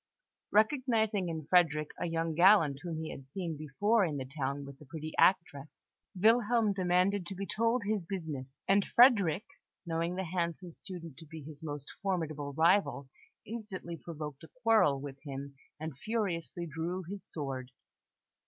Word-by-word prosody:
Recognising 220 -4 +2
in 160 -2 -4
Frederick 155 -3 +3
a 175 - -1
young 165 0 -1
gallant 165 -5 +5
whom 170 -2 -4
he 160 - -5
had 135 - -9
seen 170 +2 -4
before 200 +10 +2
in 155 -5 -1
the 130 - -4
town 140 0 -3
with 140 0 -11
the 150 - -13
pretty 155 +2 -6
actress, 160 -6 +1 0.3
Wilhelm 225 0 +4
demanded 185 0 +2
to 195 - -5
be 195 +2 -4
told 230 +3 +1
his 205 -2 0
business; 150 -7 -6
and 200 +1 +5
Frederick, 210 - +5 0.4
knowing 170 +1 -1
the 190 - -2
handsome 170 0 -3
student 165 -4 -9
to 160 - -12
be 160 -1 -9
his 150 +1 -10
most 145 -3 -6
formidable 155 -7 -2
rival, 165 -3 +3 0.4
instantly 205 -6 -6
provoked 150 -3 -7
a 160 - -11
quarrel 220 -12 +4
with 135 -1 -8
him, 140 -1 -6 0.3
and 160 -2 -5
furiously 185 -5 -2
drew 170 +3 -3
his 195 +3 -7
sword. 135 -4 -5
170 Hz, 155 wpm, -32 LUFS, 150-195 Hz, 0.4 s, gallant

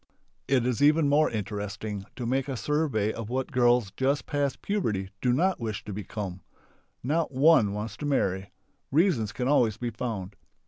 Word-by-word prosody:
It 130 -3 +2
is 125 +1 0
even 150 +1 +5
more 150 +2 +4
interesting 105 -1 -4
to 125 - -5
make 130 +3 0
a 135 -3 -3
survey 140 -8 0
of 115 -2 -6
what 130 +3 -2
girls 120 -5 +3
just 135 -1 0
past 145 -3 -2
puberty 105 - -1
do 125 - +2
not 180 +9 +2
wish 110 -4 -4
to 105 - -5
become. 100 -2 -5 0.6
Not 155 +5 0
one 135 -6 +5
wants 105 0 -5
to 145 - -4
marry. 95 -9 0 0.4
(Reasons 145 - +2
can 125 +4 -2
always 120 -7 +3
be 120 -1 -3
found.) 105 -4 -4
120 Hz, 170 wpm, -27 LUFS, 105-145 Hz, 0.6 s, even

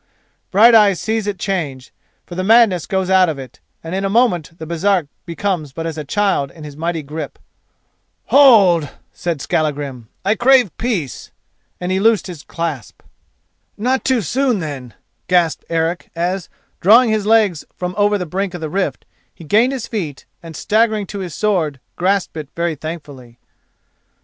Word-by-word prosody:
Brighteyes 210 -2 +6
sees 220 -1 -2
it 205 -2 -2
change, 150 -11 -4 0.3
for - - -10
the 185 +1 -2
madness 215 -5 +4
goes 190 -2 -1
out 185 -2 +5
of 155 - -3
it, 130 -2 -10 0.2
and 165 +2 -6
in 195 +1 -1
a 195 - 0
moment 190 -8 +1
the 160 - -7
Baresark 170 0 0 0.2
becomes 170 -5 -3
but 165 +2 -5
as 165 -2 -3
a 155 - -5
child 170 -3 0
in 155 +2 -13
his 145 -2 -9
mighty 165 0 -3
grip. 155 +3 -6 1.0
"Hold!" 200 - +6 0.2
said 170 -5 -3
Skallagrim, 140 -6 -2 0.2
"I 200 - +3
crave 245 -3 +4
peace," 200 - -3 0.5
and 180 +1 -3
he 190 - +1
loosed 220 +1 +3
his 175 -6 -8
clasp. 160 -9 -5 0.7
"Not 255 +5 0
too 255 -4 +1
soon, 255 - +1
then," 140 - -6 0.3
gasped 175 -4 +1
Eric 165 +1 -1
as, 180 +2 -2 0.3
drawing 225 +5 +6
his 215 -1 0
legs 215 -8 +3
from 180 0 -4
over 205 0 +2
the 180 - -4
brink 190 +2 -3
of 175 - -7
the 155 -2 -4
rift, 195 +2 -2 0.3
he - - -14
gained 220 - +3
his 260 -4 -4
feet 165 - -5 0.2
and, 165 -1 -10
staggering 215 +3 +1
to 200 +1 -7
his 180 -6 -6
sword, 170 -10 0 0.2
grasped 190 0 0
it 150 -3 -6
very 170 -1 -1
thankfully. 145 -6 -9
180 Hz, 165 wpm, -18 LUFS, 155-210 Hz, 1.0 s, Brighteyes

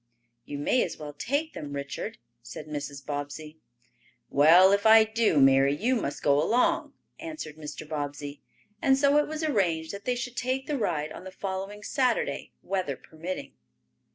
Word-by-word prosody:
"You 145 - -6
may 195 - +2
as - - -2
well 150 -1 -7
take 285 - -2
them, 145 -2 -7
Richard," 140 +9 -5 0.2
said 120 +5 -9
Mrs. 145 -2 -6
Bobbsey. 145 +2 -6 0.7
"Well, 170 +7 +7
if 200 +2 +3
I 220 0 +9
do, 220 -7 +2
Mary, 135 +1 +5
you 240 - +1
must 145 - -3
go 145 0 +4
along," 235 +10 +1 0.3
answered 310 - -7
Mr. 155 0 -8
Bobbsey, 145 -1 -5 0.4
and 265 -1 +4
so 280 +1 +4
it 295 - +1
was 310 +1 -4
arranged 175 - 0
that 200 0 -8
they 250 - +1
should 245 0 -5
take 255 +2 -1
the 300 - -2
ride 155 -7 -1
on - - -9
the 190 - -7
following 195 +2 -5
Saturday, 280 - 0
weather 185 -8 -2
permitting. 170 +4 -7
180 Hz, 165 wpm, -27 LUFS, 145-245 Hz, 0.7 s, I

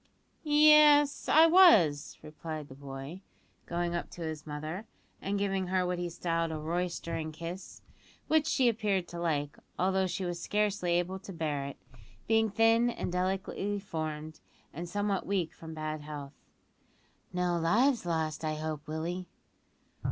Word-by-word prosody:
"Yes, 295 -1 +6
I 315 +2 +7
was," 220 - +5
replied 155 -1 -7
the - - -10
boy, 140 +5 -8 0.5
going 175 0 -1
up 170 - -3
to 175 - -7
his 160 -1 -5
mother, 155 +8 -5 0.3
and 200 +1 -1
giving 195 -2 -1
her 185 0 +1
what 180 0 -2
he 175 0 -2
styled 165 -1 -1
a 160 - -3
"roystering" 165 0 -3
kiss, 170 +4 -8 0.4
which 315 -1 +3
she 260 -3 +3
appeared 205 -6 0
to 170 - -7
like, 150 -4 -1 0.2
although 190 +1 +1
she 185 +1 -3
was 175 -1 -4
scarcely 205 -4 0
able 175 +2 0
to 195 - -10
bear 150 -5 -2
it, 140 - -8 0.5
being 225 0 +3
thin 225 +3 +4
and 235 - -4
delicately 190 +2 -1
formed, 155 -5 -5 0.3
and 170 +2 -6
somewhat 205 0 -1
weak 185 -5 -1
from 160 -1 -10
bad 155 0 -4
health. 145 -2 -8 1.0
"No 180 -1 0
lives 235 +10 +3
lost, 160 -2 -2
I 155 -1 -1
hope, 155 -1 -5
Willie?" 170 +4 -4
175 Hz, 150 wpm, -30 LUFS, 155-200 Hz, 1.0 s, I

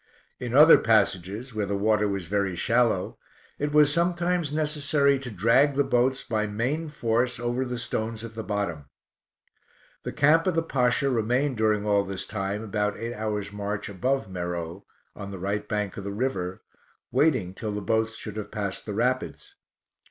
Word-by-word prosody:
In 125 0 -3
other 155 +3 +9
passages, 110 +2 +1
where 105 -2 -2
the 100 0 -1
water 105 +1 +2
was 100 -3 -3
very 100 0 -1
shallow, 115 -1 +1 0.4
it 145 0 -1
was 150 -1 +5
sometimes 175 -1 +1
necessary 145 -2 +1
to 130 -2 -7
drag 115 +8 +3
the 140 - +3
boats 130 +1 +1
by 110 -2 -1
main 130 +10 -2
force 120 -3 0
over 120 +2 -1
the 125 -1 -4
stones 110 -1 -3
at 115 -1 -8
the 110 0 -5
bottom. 100 -8 -3 1.2
The - - -5
camp 155 +4 +4
of 180 - +1
the 165 - +2
Pasha 125 -2 +1
remained 125 +3 0
during 105 -1 +1
all 100 -1 +3
this 95 -1 -5
time 100 +1 -3
about 105 -1 -1
eight 115 +1 -4
hours 105 -2 -3
march 105 0 -4
above 125 +5 -1
Meroe, 90 0 -5 0.3
on 100 -1 -7
the 100 - -7
right 100 +3 -3
bank 105 -2 -2
of 100 - -5
the 100 - -4
river, 100 -5 -3 0.5
waiting 125 - +2
till 105 +2 -5
the 105 - -3
boats 110 +2 0
should 110 -2 -7
have 105 -1 -5
passed 100 -2 -4
the 105 - -4
rapids. 125 +3 -1
110 Hz, 175 wpm, -26 LUFS, 100-130 Hz, 1.2 s, other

